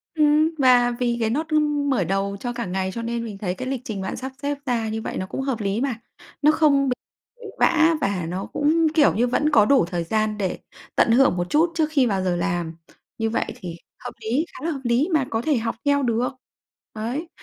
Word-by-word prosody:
Ừm, 305 Hz, +1 st, +4 dB
và 250 Hz, -2 st, +5 dB
vì 240 Hz, -1 st, 0 dB
cái 220 Hz, -1 st, +1 dB
nốt 310 Hz, +7 st, -1 dB
ưm, 295 Hz, -2 st, +1 dB
mở 245 Hz, -9 st, +2 dB
đầu 195 Hz, +2 st, -1 dB
cho 245 Hz, +2 st, -4 dB
cả 235 Hz, 0 st, -4 dB
ngày 190 Hz, +1 st, -2 dB
cho 230 Hz, -, -4 dB
nên 235 Hz, 0 st, -3 dB
mình 210 Hz, -3 st, -7 dB
thấy 185 Hz, -3 st, -2 dB
cái 255 Hz, -, -5 dB
lịch 260 Hz, -2 st, -3 dB
trình 205 Hz, -3 st, -4 dB
bạn 190 Hz, -, -4 dB
sắp 265 Hz, +1 st, -5 dB
xếp 285 Hz, 0 st, -2 dB
ra 235 Hz, -4 st, -1 dB
như 220 Hz, +1 st, -3 dB
vậy -, -, -5 dB
nó 185 Hz, -, -2 dB
cũng 230 Hz, -, -5 dB
hợp 265 Hz, -5 st, -2 dB
lý 200 Hz, +4 st, -1 dB
mà. 270 Hz, -4 st, -1 dB, 0.5 s
Nó 300 Hz, -, +6 dB
không 285 Hz, -3 st, +3 dB
bị 250 Hz, -, 0 dB, 0.6 s
vã 330 Hz, 0 st, +4 dB
và 195 Hz, -, -1 dB
nó 180 Hz, +3 st, -4 dB
cũng, 320 Hz, +2 st, +2 dB
kiểu 305 Hz, -3 st, +4 dB
như, 240 Hz, +4 st, +2 dB
vẫn 295 Hz, +5 st, +1 dB
có 220 Hz, -8 st, +5 dB
đủ 265 Hz, -7 st, +4 dB
thời 175 Hz, -1 st, -3 dB
gian 215 Hz, +4 st, -1 dB
để 190 Hz, -3 st, -2 dB, 0.4 s
tận 230 Hz, -, +4 dB
hưởng 250 Hz, -6 st, +4 dB
một 175 Hz, 0 st, -2 dB
chút 330 Hz, +3 st, +3 dB
trước 315 Hz, -2 st, +2 dB
khi 275 Hz, -5 st, +3 dB
vào 195 Hz, -4 st, 0 dB
giờ 180 Hz, -1 st, 0 dB
làm. 170 Hz, -1 st, -2 dB, 0.4 s
Như 225 Hz, 0 st, 0 dB
vậy 230 Hz, -, 0 dB
thì 175 Hz, -3 st, -7 dB, 0.3 s
hợp -, -, -5 dB
lý, 250 Hz, +9 st, 0 dB
khá -, -, -8 dB
là 335 Hz, -, 0 dB
hợp 275 Hz, -3 st, -5 dB
lý 245 Hz, +8 st, +1 dB
mà 295 Hz, -4 st, +3 dB
có 225 Hz, 0 st, -1 dB
thể 290 Hz, -1 st, +1 dB
học 230 Hz, 0 st, -2 dB
theo 285 Hz, 0 st, +3 dB
được. 240 Hz, 0 st, +1 dB, 0.7 s
Đấy. 245 Hz, +10 st, -3 dB
240 Hz, 240 wpm, -23 LUFS, 205-285 Hz, 0.7 s, Nó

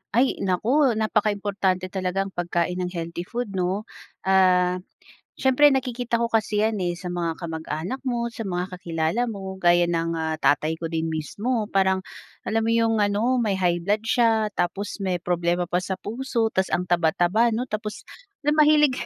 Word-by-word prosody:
Ay 255 Hz, +3 st, +2 dB
naku 235 Hz, +7 st, +2 dB
napakaimportante 200 Hz, -3 st, 0 dB
talaga 190 Hz, 0 st, -1 dB
ang 195 Hz, -, -8 dB
pagkain 175 Hz, 0 st, -1 dB
ng 180 Hz, -, -1 dB
healthy 170 Hz, +1 st, -5 dB
food 240 Hz, -3 st, -4 dB
'no. 190 Hz, +2 st, -1 dB, 0.4 s
Ah, 185 Hz, -1 st, +3 dB, 0.6 s
siyempre 275 Hz, +2 st, +5 dB
nakikita 245 Hz, -3 st, -1 dB
ko 235 Hz, -, +1 dB
kasi 215 Hz, -2 st, +1 dB
yan 220 Hz, 0 st, +1 dB
eh, 175 Hz, -2 st, -1 dB
sa 180 Hz, +1 st, -7 dB
mga 170 Hz, -1 st, -3 dB
kamag-anak 160 Hz, -, -4 dB
mo, 240 Hz, -2 st, -1 dB
sa 230 Hz, -1 st, -7 dB
mga 180 Hz, -1 st, -2 dB
kakilala 165 Hz, +5 st, -1 dB
mo 195 Hz, -4 st, -5 dB
gaya 175 Hz, -1 st, +3 dB
ng, 165 Hz, -1 st, 0 dB
ah, 160 Hz, -1 st, -2 dB
tatay 155 Hz, +1 st, +1 dB
ko 165 Hz, 0 st, -5 dB
din 165 Hz, 0 st, -1 dB
mismo 210 Hz, +9 st, -2 dB
parang 190 Hz, -1 st, +2 dB, 0.4 s
alam 225 Hz, +1 st, 0 dB
mo 225 Hz, -, -1 dB
yung 225 Hz, -1 st, +2 dB
ano 215 Hz, +5 st, +2 dB
may 205 Hz, -4 st, +1 dB
high 175 Hz, -2 st, +1 dB
blood 205 Hz, +5 st, 0 dB
siya, 225 Hz, -2 st, +2 dB
tapos 195 Hz, +4 st, -3 dB
may 190 Hz, -2 st, 0 dB
problema 175 Hz, 0 st, 0 dB
pa 175 Hz, +1 st, -1 dB
sa 190 Hz, +1 st, -3 dB
puso, 230 Hz, +2 st, -2 dB
tapos 190 Hz, 0 st, +1 dB
ang 180 Hz, -, 0 dB
taba-taba 175 Hz, +6 st, +2 dB
'no 230 Hz, +2 st, -1 dB
tapos 215 Hz, -3 st, -5 dB, 0.4 s
la 295 Hz, -, +3 dB
mahilig, 300 Hz, -2 st, +5 dB
190 Hz, 170 wpm, -24 LUFS, 175-225 Hz, 0.6 s, siyempre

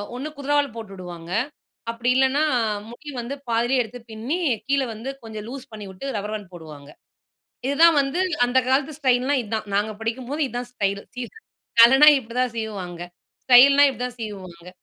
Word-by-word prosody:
ஒண்ணு 275 Hz, +5 st, -5 dB
குதிரவால் 285 Hz, -2 st, 0 dB
போட்டுவிடுவாங்க. 180 Hz, -6 st, -9 dB, 0.6 s
அப்பிடி 240 Hz, +2 st, 0 dB
இல்லன்னா 265 Hz, +3 st, +3 dB, 0.5 s
முடி 295 Hz, +5 st, -11 dB
வந்து 250 Hz, +4 st, -5 dB
பாதியிலே 240 Hz, +3 st, +2 dB
எடுத்து 245 Hz, +2 st, -10 dB
பின்னி 240 Hz, +11 st, -3 dB, 0.3 s
கீழே 275 Hz, -1 st, +2 dB
வந்து 230 Hz, +5 st, -7 dB
கொஞ்சம் 215 Hz, -2 st, -7 dB
லூஸ் 265 Hz, 0 st, -9 dB
பண்ணிவுட்டு 205 Hz, +3 st, -8 dB
ரப்பர் 210 Hz, +1 st, -3 dB
பேண்டு 205 Hz, -4 st, -9 dB
போடுவாங்க. 150 Hz, -4 st, -11 dB, 0.8 s
இதுதான் 315 Hz, +3 st, +5 dB
வந்து 275 Hz, +6 st, -1 dB, 0.3 s
அந்த 255 Hz, +2 st, +2 dB
காலத்து 275 Hz, +2 st, +1 dB
ஸ்டைல் 255 Hz, -2 st, +2 dB
னா 285 Hz, -, +3 dB
இதுதான். 215 Hz, -1 st, -4 dB
நாங்க 210 Hz, +2 st, 0 dB
படிக்கும்போது 255 Hz, +6 st, -3 dB
இதுதான் 245 Hz, 0 st, -5 dB
ஸ்டைலு. 200 Hz, -3 st, -2 dB, 0.2 s
இ -, -, -2 dB, 0.6 s
தலன்னா 270 Hz, +6 st, +8 dB
இப்பிடிதான் 250 Hz, 0 st, -2 dB
சீவுவாங்க 195 Hz, -6 st, -5 dB, 0.4 s
ஸ்டைல்னா 275 Hz, +3 st, +7 dB
இப்பிடிதான் 250 Hz, -1 st, -5 dB
சீவு 215 Hz, -3 st, -5 dB
வாங்க. 170 Hz, +1 st, -14 dB
245 Hz, 150 wpm, -23 LUFS, 210-270 Hz, 0.8 s, தலன்னா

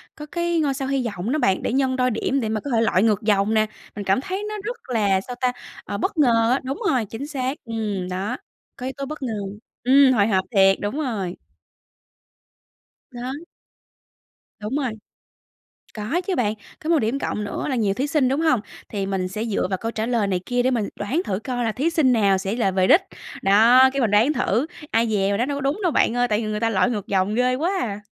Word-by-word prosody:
Có 300 Hz, -, -8 dB
cái 345 Hz, -1 st, 0 dB
ngôi 285 Hz, -3 st, +1 dB
sao 265 Hz, 0 st, -3 dB
hy 270 Hz, -3 st, 0 dB
vọng 205 Hz, +1 st, -3 dB
đó 310 Hz, -, +1 dB
bạn, 190 Hz, -9 st, +2 dB
để -, -, -1 dB
nhân 265 Hz, -1 st, +1 dB
đôi 255 Hz, -1 st, +1 dB
điểm 265 Hz, +5 st, 0 dB
để 220 Hz, -4 st, -2 dB
mà 220 Hz, -1 st, -1 dB
có 285 Hz, -, -5 dB
thể 225 Hz, -, +3 dB
lội 195 Hz, -4 st, +3 dB
ngược 215 Hz, -2 st, +2 dB
dòng 210 Hz, 0 st, +2 dB
nè. 215 Hz, -1 st, +3 dB, 0.3 s
Mình 205 Hz, -1 st, -5 dB
cảm 195 Hz, +7 st, +2 dB
thấy 380 Hz, +6 st, -4 dB
nó 425 Hz, -, -4 dB
rất 475 Hz, +3 st, -4 dB
là, 205 Hz, -5 st, +2 dB
sao 245 Hz, +4 st, -7 dB
ta? 250 Hz, -1 st, +2 dB, 0.3 s
Ờ, 200 Hz, -, -4 dB
bất 380 Hz, -, -2 dB
ngờ 230 Hz, -5 st, +4 dB
á, 265 Hz, -, +1 dB
đúng 265 Hz, +2 st, -4 dB
rồi, 245 Hz, -5 st, +1 dB
chính 225 Hz, +8 st, -7 dB
xác, 270 Hz, -1 st, -3 dB
ừm, 210 Hz, -5 st, -3 dB
đó, 195 Hz, +7 st, -3 dB, 0.4 s
có 250 Hz, -, -7 dB
yếu 265 Hz, -, -3 dB
tố 275 Hz, -, -3 dB
bất 300 Hz, -1 st, -7 dB
ngờ. 235 Hz, -3 st, -2 dB, 0.5 s
Ừm, 265 Hz, +1 st, +6 dB
hồi 205 Hz, -4 st, +3 dB
hộp 190 Hz, -3 st, +1 dB
thiệt, 195 Hz, -3 st, +4 dB
đúng 205 Hz, +8 st, -2 dB
rồi. 205 Hz, -, -3 dB, 1.7 s
Đó. 245 Hz, +1 st, -5 dB, 1.3 s
Đúng 215 Hz, +6 st, -3 dB
rồi. 265 Hz, -5 st, -1 dB, 1.0 s
Có 245 Hz, -, -1 dB
chứ 380 Hz, -, 0 dB
bạn. 215 Hz, -4 st, +1 dB, 0.3 s
Có 315 Hz, -, -3 dB
một 330 Hz, -3 st, +4 dB
điểm 235 Hz, +5 st, -1 dB
cộng 210 Hz, -, -2 dB
nữa 205 Hz, -, -4 dB
là 265 Hz, -, 0 dB
nhiều 210 Hz, -5 st, +1 dB
thí 270 Hz, +7 st, -2 dB
sinh, 285 Hz, -3 st, +2 dB
đúng 270 Hz, +4 st, 0 dB
hông? 315 Hz, -8 st, +3 dB, 0.3 s
Thì 200 Hz, -2 st, -2 dB
mình 190 Hz, -2 st, -1 dB
sẽ 210 Hz, +4 st, -4 dB
dựa 210 Hz, -4 st, -1 dB
vào 190 Hz, 0 st, -2 dB
câu 225 Hz, +4 st, -4 dB
trả 220 Hz, -1 st, -2 dB
lời 230 Hz, -4 st, +1 dB
này 185 Hz, -2 st, 0 dB
kia 245 Hz, 0 st, 0 dB
để 260 Hz, -, +2 dB
mình 225 Hz, -5 st, -1 dB
đoán 260 Hz, -, 0 dB
thử 190 Hz, -1 st, -2 dB
coi 245 Hz, +2 st, -3 dB
là 225 Hz, -, +1 dB
thí 280 Hz, +9 st, 0 dB
sinh 305 Hz, -6 st, +3 dB
nào 200 Hz, -4 st, +3 dB
sẽ 195 Hz, +3 st, -3 dB
là 210 Hz, -6 st, +1 dB
về 185 Hz, 0 st, +2 dB
đích. 350 Hz, -, +6 dB, 0.4 s
Đó, 230 Hz, +7 st, +6 dB
cái 275 Hz, -, 0 dB
mình 220 Hz, -4 st, +1 dB
đoán 230 Hz, +9 st, +4 dB
thử, 235 Hz, +2 st, +1 dB, 0.3 s
ai 230 Hz, +1 st, +2 dB
dè 195 Hz, -2 st, +1 dB
mình 200 Hz, -, +1 dB
đoán 245 Hz, +4 st, 0 dB
đâu 280 Hz, -, -2 dB
có -, -, -4 dB
đúng 280 Hz, +8 st, 0 dB
đâu, 350 Hz, -, +2 dB
bạn 240 Hz, -, +2 dB
ơi, 245 Hz, 0 st, +2 dB
tại 210 Hz, -2 st, +1 dB
vì 220 Hz, -, -3 dB
người 210 Hz, 0 st, -2 dB
ta 230 Hz, -1 st, +1 dB
lội 190 Hz, +1 st, +2 dB
ngược 210 Hz, -5 st, -4 dB
dòng 195 Hz, +2 st, +1 dB
ghê 250 Hz, +1 st, +2 dB
quá 335 Hz, +8 st, 0 dB
à. 205 Hz, -3 st, -3 dB
230 Hz, 245 wpm, -23 LUFS, 205-270 Hz, 1.7 s, Ừm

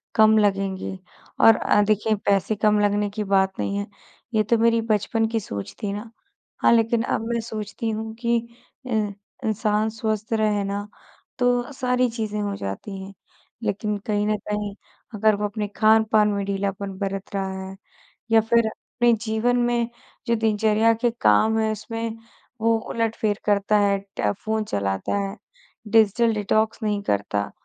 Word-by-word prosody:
कम 220 Hz, 0 st, +6 dB
लगेंगे 195 Hz, -2 st, 0 dB, 0.4 s
और 225 Hz, -, +8 dB
अ, 210 Hz, -, +3 dB
देखिए, 215 Hz, +1 st, +2 dB
पैसे 200 Hz, +1 st, +1 dB
कम 210 Hz, 0 st, +3 dB
लगने 205 Hz, 0 st, +1 dB
की 210 Hz, +1 st, -4 dB
बात 190 Hz, -1 st, +1 dB
नहीं 200 Hz, -, -1 dB
है, 205 Hz, 0 st, -3 dB, 0.5 s
ये 215 Hz, -1 st, +3 dB
तो 230 Hz, +3 st, +2 dB
मेरी 230 Hz, 0 st, +3 dB
बचपन 225 Hz, +1 st, 0 dB
की 225 Hz, 0 st, -1 dB
सोच 100 Hz, -, -6 dB
थी 200 Hz, -, -1 dB
ना। 210 Hz, +3 st, -6 dB, 0.5 s
हाँ, -, -, +6 dB
लेकिन 230 Hz, 0 st, +3 dB
अब -, -, -1 dB
मैं 235 Hz, -, 0 dB
सोचती 220 Hz, 0 st, -5 dB
हूँ 220 Hz, 0 st, -4 dB
कि 235 Hz, 0 st, +2 dB, 0.5 s
अ, -, -, -7 dB, 0.6 s
इंसान 215 Hz, 0 st, +1 dB
स्वस्थ 220 Hz, -1 st, -3 dB
रहे 215 Hz, -2 st, +1 dB
ना, 200 Hz, +1 st, -3 dB, 0.5 s
तो 245 Hz, +1 st, +1 dB
सारी 250 Hz, -1 st, +1 dB
चीज़ें 220 Hz, -2 st, -3 dB
हो 200 Hz, -1 st, -2 dB
जाती 145 Hz, -, -6 dB
हैं। 195 Hz, +1 st, -10 dB, 0.5 s
लेकिन 210 Hz, 0 st, -1 dB
कहीं 205 Hz, -1 st, +1 dB
न 215 Hz, -, +2 dB
कहीं 210 Hz, -1 st, -2 dB, 0.4 s
अगर 215 Hz, 0 st, +3 dB
वो 210 Hz, +1 st, -2 dB
अपने 210 Hz, 0 st, -3 dB
खान-पान 220 Hz, -1 st, +4 dB
में 200 Hz, -1 st, -1 dB
ढीलापन 200 Hz, 0 st, -2 dB
बरत 195 Hz, +1 st, -4 dB
रहा 195 Hz, -1 st, -1 dB, 0.2 s
है 190 Hz, -, -9 dB, 0.6 s
या 225 Hz, 0 st, +6 dB
फिर 230 Hz, +1 st, +2 dB
अपने 240 Hz, +2 st, 0 dB
जीवन 220 Hz, +3 st, +1 dB
में 240 Hz, -1 st, +1 dB, 0.4 s
जो 235 Hz, -, +2 dB
दिनचर्या 220 Hz, 0 st, +3 dB
के 240 Hz, -, +3 dB
काम 215 Hz, -, +4 dB
हैं, 220 Hz, 0 st, +1 dB
उसमें 225 Hz, +1 st, -5 dB, 0.4 s
वो 230 Hz, 0 st, +3 dB
उलटफेर 220 Hz, -2 st, -1 dB
करता 205 Hz, 0 st, +2 dB
है, 200 Hz, -1 st, +3 dB, 0.2 s
ट 105 Hz, -, +2 dB
फ़ोन 220 Hz, 0 st, 0 dB
चलाता 100 Hz, -, -2 dB
है, 200 Hz, 0 st, -2 dB, 0.5 s
डिजिटल 225 Hz, +1 st, +4 dB
डिटॉक्स 215 Hz, +2 st, 0 dB
नहीं 210 Hz, -1 st, 0 dB
करता। 100 Hz, -, -1 dB
215 Hz, 160 wpm, -23 LUFS, 200-225 Hz, 0.6 s, और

